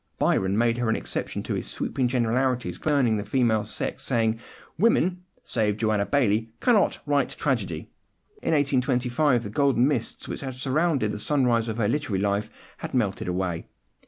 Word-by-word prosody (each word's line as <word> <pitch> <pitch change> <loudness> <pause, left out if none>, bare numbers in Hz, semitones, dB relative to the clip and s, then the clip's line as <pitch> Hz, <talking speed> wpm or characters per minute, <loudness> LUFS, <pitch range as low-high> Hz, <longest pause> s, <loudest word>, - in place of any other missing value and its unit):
Byron 95 +1 +1
made 120 +1 +2
her 120 -2 0
an 110 - +2
exception - - -4
to - - -3
his - - -3
sweeping 130 -3 -1
generalities 125 +1 0
concerning 135 -8 +2
the 105 - -3
female 110 -1 +1
sex, - - -1
saying, 115 -1 0 0.4
"Woman 185 -4 +2 0.2
(save 105 -1 0
Joanna 110 -2 +1
Baillie) 115 -5 +1
cannot 230 -5 +3
write 145 -1 +1
tragedy." - - -2 0.5
In - - 0
1825 130 -1 +2
the 105 - -5
golden 135 0 +3
mists 150 - -2
which - - -5
had 130 -2 -5
surrounded 135 -2 +1
the 105 - -5
sunrise 120 -4 +1
of 110 0 -3
her 110 -3 +1
literary 120 -5 -1
life 100 +2 0 0.3
had - - -6
melted 105 -7 0
away. 90 -2 -2
120 Hz, 160 wpm, -25 LUFS, 110-140 Hz, 0.5 s, cannot